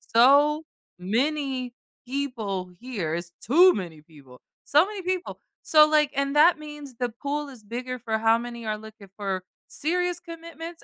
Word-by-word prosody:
so 285 +6 +6 0.4
many 255 +5 -1 0.3
people 230 -9 -3
here, 200 -11 -3
it's 170 0 -5
too 350 - +6
many 170 -5 -6
people, 145 -5 -17 0.3
so 300 +5 +5
many 410 -1 -6
people. 370 0 -3 0.2
So, 305 -1 +6
like, 300 -2 +3
and 275 +1 0
that 315 +2 +6
means 295 -3 -9
the 245 -1 0
pool 285 +5 -4
is 250 -5 -13
bigger 250 +4 -5
for 220 -2 -2
how 225 +1 +4
many 235 -1 -7
are 215 0 -1
looking 215 -2 -13
for 195 -3 -3 0.2
serious 355 +3 -1
commitments 335 -1 -9
255 Hz, 155 wpm, -25 LUFS, 220-305 Hz, 0.4 s, so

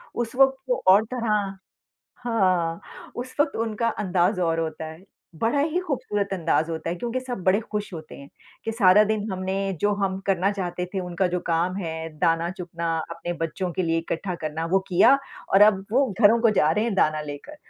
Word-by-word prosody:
उस 240 0 -3
वक़्त 270 0 +5
वो 250 - 0
और 200 +3 +7
तरह 210 -5 -1 0.7
हाँ 185 -8 +1 0.4
उस 250 +1 -6
वक़्त 290 -1 +2
उनका 230 +1 -1
अंदाज़ 185 0 +1
और 165 -1 +1
होता 160 0 -4
है। 160 +4 -11 0.4
बड़ा 260 +5 +2
ही 315 +4 0
खूबसूरत 220 -8 -2
अंदाज 165 -2 0
होता 160 +1 -3
है 175 - -3
क्योंकि 240 +5 -3
सब 245 -7 -6
बड़े 190 +3 +4
खुश 210 -2 -3
होते 160 -1 -9
हैं 140 0 -12 0.4
कि 225 - -2
सारा 210 -2 +6
दिन 215 0 -2
हमने 190 +1 -2 0.2
जो 205 0 +2
हम 190 0 -2
करना 195 0 +2
चाहते 180 -2 -3
थे, 190 - 0
उनका 180 +1 -1
जो 180 0 -2
काम 170 +3 0
है 160 -3 -4
दाना 165 0 +1
चुगने 175 -2 -7 0.3
अपने 175 +1 -4
बच्चों 175 +3 -3
के 185 +2 -1
लिए 165 -1 +1
इकट्ठा 170 +2 -3
करना, 160 0 -4
वो 190 +3 +3
किया 215 +10 +5 0.4
और 195 - +6
अब 200 -2 +5
वो 270 +2 +4
घरों 225 +2 +6
को 230 - +4
जा 150 - +3
रहे 210 +7 +1
हैं 230 - -1
दाना 155 -4 +2
लेकर। 150 - -8
190 Hz, 195 wpm, -24 LUFS, 170-220 Hz, 0.7 s, और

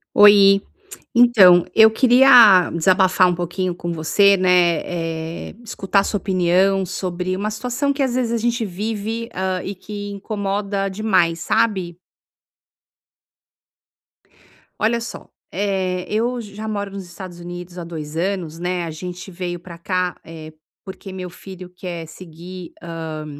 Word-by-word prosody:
Oi. 200 -1 +7 0.5
Então, 205 -8 +6
eu 220 0 +7
queria 240 -6 +6
desabafar 185 +2 +3
um 175 - 0
pouquinho 175 +1 -3
com 175 0 -5
você, 195 +5 +3
né, 180 -3 +3 0.7
eh, - - -13
escutar 200 -3 0
a - - -4
sua 205 - -2
opinião 190 +1 +1
sobre 185 0 -3
uma 210 +2 -2
situação 250 +6 -2
que 280 0 -1
às 260 -2 -1
vezes 250 -2 -1
a 235 - 0
gente 235 +1 -1
vive, 215 +4 -4
hã, 185 0 -2
e 195 - -5
que 205 +1 -7
incomoda 200 -1 -3
demais, 190 -5 +1
sabe? 180 -3 0 2.8
Olha 235 +2 +1
só, 230 - -8 0.2
eh, 190 -2 -2
eu 235 +4 -1
j 210 -4 -9
já 215 +2 -7
moro 205 -2 -4
nos 195 0 -7
Estados 175 0 -10
Unidos 175 +1 -8
há - - -6
2 160 -3 -8
anos, 170 -2 -3
né, 180 0 -2
a 165 - -5
gente 180 +4 -8
veio 175 -1 -5
para 170 0 -11
cá, 180 +1 -2
eh, 160 -1 -11 0.3
porque 190 0 -9
meu 185 -1 -7
filho 185 0 -11
quer 175 -3 -6
seguir, 175 +2 -11
hã, 160 -2 -6
185 Hz, 145 wpm, -20 LUFS, 175-205 Hz, 2.8 s, Oi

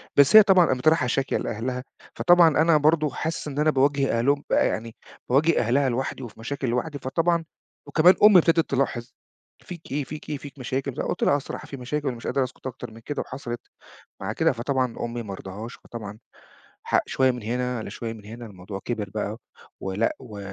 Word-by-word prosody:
بس 140 +8 +6
هي 215 - +12
طبعًا 185 -4 +5
قامت 130 +1 -1
رايحة 155 -6 +4
شاكية 135 +2 0
لأهلها، 125 +3 -3 0.3
فطبعًا 175 -1 +6
أنا 165 -1 +5
برضه 155 0 +3
حاسس 160 0 -4
إن 145 0 -4
أنا 155 +1 +3
بَاواجه 135 -3 +2
أهلهم 140 +4 +1
بقى - - +3
يعني، 115 0 -4 0.3
بَاواجه 155 +6 +3
أهلها 130 +4 +2
لوحدي 130 +1 -3
وفي 115 -2 -10
مشاكل 135 +3 -4
لوحدي، 145 +4 -2
فطبعًا 165 +5 0 0.4
وكمان 175 +3 +5
أمي 210 -3 +9
ابتدت 165 0 +2
تلاحظ 125 -3 -1 0.5
"فيك 170 -6 -11
إيه؟ 145 +1 -1
فيك 150 +2 -9
إيه؟ 145 - -2
فيك 140 0 -11
مشاكل؟" 130 +1 -3
فقُلت - - -2
لها - - +4
"أه - - +4
الصراحة 135 - -7
في 140 - -7
مشاكل 145 +3 -3
ومش 120 -2 -4
قادر 135 - +1
أسكُت 130 +1 -7
أكتر 120 - -7
من 115 - -12
كده، 145 +5 -4
وحصلت 120 -3 -6 0.6
مع 100 +3 -3
كده". 165 +3 +2
فطبعًا 125 0 -1
أمي 120 0 -4
ما 100 -2 -6
رضهاش، 100 +5 -8
فطبعًا 105 -2 -9 0.6
حق - - +2
شوية 130 -1 +3
من 120 -3 -7
هنا 125 +2 -2
على - - -6
شوية 115 -1 -5
من 105 -2 -13
هنا، 115 +3 -9
الموضوع 95 -1 -8
كِبِر 105 -5 -3
بقى 105 +1 -4 0.4
ولأ، 95 +4 -1
و 110 -6 -10
130 Hz, 195 wpm, -25 LUFS, 115-150 Hz, 0.6 s, هي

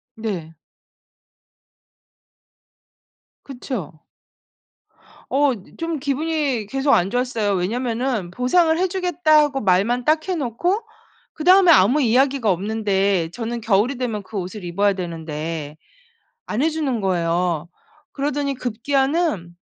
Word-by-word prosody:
네. 190 -8 -5 2.9
그쵸. 245 - -7 1.3
어 280 0 +3
이 205 -5 -13
좀 330 -2 -3
기분이 285 -4 -1
계속 270 +4 +1
안 180 +2 +3
좋았어요. 245 -4 -1
왜냐하면은 230 +1 -1
보상을 320 - +2
해 370 - +2
주겠다고 310 -6 +2
말만 215 +6 +2
딱 315 +3 +2
해 370 - +1
놓고 335 - -1 0.5
그다음에 365 +2 +6
아무 300 -1 +5
이야기가 260 -1 +2
없는데 195 -2 0
저는 235 +1 -4
겨울이 225 +4 +1
되면 235 -5 -3
그 200 +2 -10
옷을 185 +2 -6
입어야 200 +4 +1
되는데 160 -4 -5 0.7
안 220 +5 -1
해 320 - +3
주는 285 -7 -2
거예요. 170 -3 0 0.4
그러더니 280 0 -2
급기야는 265 - -1
240 Hz, 240 characters per minute, -21 LUFS, 190-285 Hz, 2.9 s, 그다음에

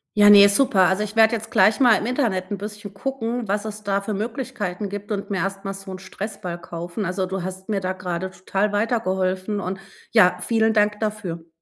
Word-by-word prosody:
Ja, 205 0 +7
ne, 200 0 +9
super. 200 -5 +4
Also, 190 +2 +1
ich 210 +1 -7
werde 225 +1 +5
jetzt 220 0 -7
gleich 215 - +4
mal 245 -5 +6
im - - -4
Internet 225 -8 -1
'n 205 - -3
bisschen 205 0 -8
gucken, 240 0 -3
was 205 +2 -1
es 215 0 -7
da 200 0 0
für 210 +2 -4
Möglichkeiten 215 -3 -4
gibt 205 +1 -7
und 200 -1 -3
mir 195 - -1
erstmal 195 +2 -3
so 195 0 -9
'n 185 - -7
Stressball 195 -2 -6
kaufen. 175 +5 -5
Also, 185 +1 -1
du 190 -1 -4
hast 190 +1 -7
mir 200 -2 0
da 185 0 -2
gerade 185 0 -4
total 195 +3 -1
weitergeholfen, 200 -2 -1
und, 190 0 -4 0.3
ja, 180 -5 +5
vielen 220 +2 +2
Dank 210 -1 +2
dafür. 195 -7 -4
200 Hz, 205 wpm, -23 LUFS, 185-215 Hz, 0.3 s, ne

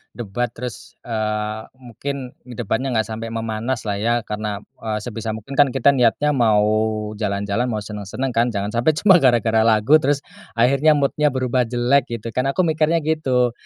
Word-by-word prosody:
Debat, 120 +1 -2
terus, 125 0 -8
eee, 110 -1 -2 0.2
mungkin 130 +2 -6 0.2
debatnya 125 +2 -2
enggak 110 -1 +1
sampai 115 +1 -5
memanas 115 +2 -3
lah 100 - 0
ya. 115 +3 +1
Karena, 105 -1 -3 0.2
eee, 110 -1 -3
sebisa 115 -1 -4
mungkin 110 +4 -11
kan 145 - +7
kita 135 +2 +4
niatnya 130 +4 +2
mau 110 -5 +3 0.6
jalan-jalan, 100 +2 -1
mau 110 - -2
senang-senang 105 +5 -4
kan, 115 +1 +3
jangan 100 -2 -2
sampai 120 +7 +1
cuma 195 -3 +6
gara-gara 120 -5 +3
lagu, 110 +5 +4
terus 145 -1 +1 0.4
akhirnya 135 +6 +4
mood-nya 145 +1 +1
berubah 130 -1 +1
jelek 120 +3 +2
gitu 115 +2 -7
kan, 125 +1 +1
aku 185 - +1
mikirnya 160 +1 +2
gitu. 130 -6 +1
120 Hz, 165 wpm, -21 LUFS, 110-135 Hz, 0.6 s, kan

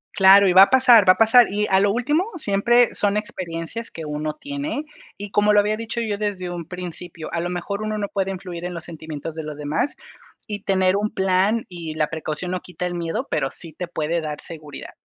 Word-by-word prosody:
Claro, 195 0 +7
y 180 - +3
va 190 +1 +10
a - - +3
pasar 245 -6 +6
va - - +10
a - - -15
pasar. 225 +2 +6
Y 210 +1 +1
a 190 - +5
lo 200 - +3
último, 295 - 0
siempre 240 -1 +3
son 205 0 0
experiencias 185 +2 -5
que 165 -2 -8
uno 150 +1 -3
tiene, 285 - -5 0.3
y 205 0 -7
como 210 0 +3
lo 210 - +6
había 210 +1 +1
dicho 230 +1 -4
yo 210 -3 -2
desde 190 -4 -3
un 175 -2 -6
principio, 175 -2 -7
a 170 - 0
lo 175 +1 -2
mejor 190 +4 -4
uno 215 0 -2
no 200 -1 -2
puede 195 -1 -1
influir 180 -2 -6
en 180 0 -4
los 170 - -6
sentimientos 160 -1 -7
de 160 - -5
los 150 -1 -7
demás, 150 - -2 0.5
y 210 -2 -4
tener 190 0 +2
un 210 +1 -1
plan 190 +4 +1
y 165 -3 -7
la 155 -1 0
precaución 160 +2 -4
no 185 - -2
quita 180 0 -6
el 175 - -3
miedo, 175 +9 -3
pero 135 - 0
sí 165 +1 -12
te 180 +2 -5
puede 165 0 -2
dar 150 -1 -5
seguridad. 155 -4 -10
185 Hz, 225 wpm, -22 LUFS, 165-210 Hz, 0.5 s, va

